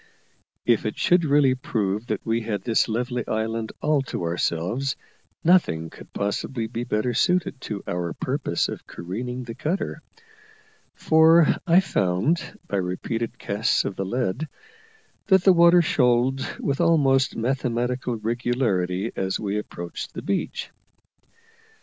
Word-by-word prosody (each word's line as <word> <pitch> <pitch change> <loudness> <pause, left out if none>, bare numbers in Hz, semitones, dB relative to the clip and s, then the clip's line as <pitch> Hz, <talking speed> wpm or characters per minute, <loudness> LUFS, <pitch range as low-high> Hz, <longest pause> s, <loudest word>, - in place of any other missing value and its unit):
If 120 -2 +3
it 105 - -4
should 175 0 +3
really 140 -2 +4
prove 105 -4 -2
that - - -3
we 115 0 0
had 105 -4 -3
this 115 -2 +2
lovely 120 +2 -1
island 110 0 -2
all 150 -2 +3
to - - -3
ourselves, 90 +10 -1 0.5
nothing 120 - +3
could - - -14
possibly 110 +4 -2
be 115 +1 -4
better 110 +3 0
suited 180 -5 +1
to 105 -3 -5
our 85 -1 -3
purpose - - -1
of - - -7
careening 125 +9 -5
the 115 -1 -7
cutter: 170 - -3 0.9
for 160 +1 +5
I 175 +2 +6
found, 95 - 0
by 100 - -1
repeated 95 +5 -3
casts 100 +2 0
of 100 - -3
the 95 - -2
lead, 125 +7 -2 0.8
that 190 -3 +5
the 190 - +7
water 170 0 +6
shoaled 130 -2 +2
with 140 +1 -1
almost 140 -5 +3
mathematical 125 0 -1
regularity 110 -4 -1
as 95 0 -1
we 105 0 -1
approached 85 -4 -7
the - - -5
beach. - - -2
120 Hz, 135 wpm, -24 LUFS, 105-140 Hz, 0.9 s, the